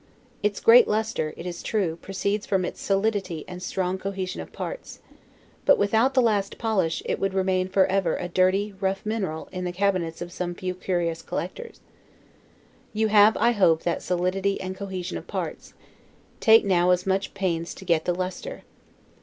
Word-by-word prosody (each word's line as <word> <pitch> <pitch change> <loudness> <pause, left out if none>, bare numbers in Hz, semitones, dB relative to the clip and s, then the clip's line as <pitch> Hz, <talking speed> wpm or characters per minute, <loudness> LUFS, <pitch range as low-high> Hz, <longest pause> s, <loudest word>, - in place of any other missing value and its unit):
Its 210 -1 0
great 235 +2 +7
lustre, 215 -7 -1
it 170 - -8
is 175 -1 -5
true, 190 -7 -1
proceeds 200 +3 -2
from 190 -2 +1
its - - -6
solidity 195 -5 -1
and 180 0 -8
strong 185 0 -2
cohesion 190 -1 -4
of - - -10
parts; - - -7 0.6
but - - +5
without 225 +6 +2
the 255 - +5
last 205 -4 0
polish, 205 -8 0
it - - -1
would 195 0 -1
remain 185 -1 +1
forever 190 -2 +2
a 180 - -4
dirty, 185 +3 +1
rough 195 +2 -1
mineral, 195 -8 -3
in 185 -1 -4
the 180 - -2
cabinets 180 -3 0
of 175 0 -6
some 175 0 -4
few 185 0 -3
curious 175 -3 -2
collectors. 475 - -6 1.1
You 220 0 +1
have; 210 +1 +6
I 235 - +4
hope, 175 -8 +3
that 170 - -1
solidity 185 +2 0
and 185 0 -5
cohesion 190 -2 -5
of - - -15
parts; - - -5 0.6
take 225 -1 +6
now 180 -2 +3
as 180 0 +2
much 195 +1 -1
pains 170 -4 -2
to 190 - -11
get 165 -3 +2
the 175 - +1
lustre. 185 - -5
190 Hz, 170 wpm, -25 LUFS, 180-205 Hz, 1.1 s, great